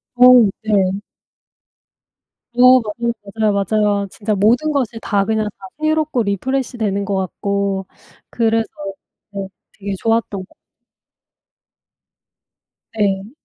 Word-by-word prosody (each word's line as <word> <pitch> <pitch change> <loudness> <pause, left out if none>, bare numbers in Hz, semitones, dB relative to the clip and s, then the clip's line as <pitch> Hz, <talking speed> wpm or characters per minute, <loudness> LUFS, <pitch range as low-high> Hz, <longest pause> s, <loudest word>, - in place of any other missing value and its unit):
어. 250 -3 +7
네. 195 -3 +1 1.6
어 255 +1 +7
맞아요, 235 +2 -3 0.2
맞아요, 215 -2 +2 0.2
맞아요. 205 -2 +2
진짜 210 +2 -3
모든 235 +10 +2
것이 250 -6 -1
다 200 -2 +1
그냥 220 0 0
다 190 - -10
새롭고 310 -5 +1
리프레시되는 215 -1 -1
것 200 0 -1
같고 195 +1 -2 0.5
그래서 225 -1 +1 0.7
네 195 -1 -4 0.3
되게 200 0 -4
좋았던 225 -4 -1
거 - - -27 2.4
네. 200 -1 0
215 Hz, 200 characters per minute, -18 LUFS, 200-240 Hz, 2.4 s, 어